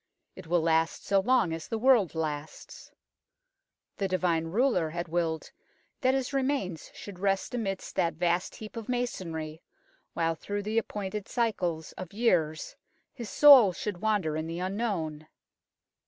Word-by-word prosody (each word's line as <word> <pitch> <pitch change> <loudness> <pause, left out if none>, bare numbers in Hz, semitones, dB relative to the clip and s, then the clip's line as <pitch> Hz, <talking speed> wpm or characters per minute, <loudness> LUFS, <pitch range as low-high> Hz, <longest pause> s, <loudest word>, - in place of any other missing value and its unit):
It 185 -3 -11
will 175 0 +2
last 165 0 +1
so 195 - +3
long 235 -5 +2
as 165 -1 -6
the 225 - -2
world 230 -7 +4
lasts. 155 -1 -5 1.1
The 195 - 0
divine 180 -3 +1
ruler 180 -2 +1
had 170 +2 -4
willed 165 -1 -2 0.5
that 260 0 +2
his 270 +1 -2
remains 260 - -1
should 200 -3 -9
rest 195 +2 0
amidst 195 -6 -3
that 165 -1 +1
vast 175 +2 0
heap 215 +1 -10
of 230 -1 -7
masonry, 165 -10 -3 0.5
while 165 -1 +1
through 205 +6 -4
the 215 +2 +1
ap - - -7
pointed 205 0 -5
cycles 180 -10 -1
of 185 0 -7
years 175 -9 +1 0.4
his 235 -5 -7
soul 255 -5 +8
should 190 -1 -5
wander 205 -8 +1
in 155 +1 -3
the 165 +1 -5
unknown. 180 -6 -3
185 Hz, 150 wpm, -29 LUFS, 165-220 Hz, 1.1 s, soul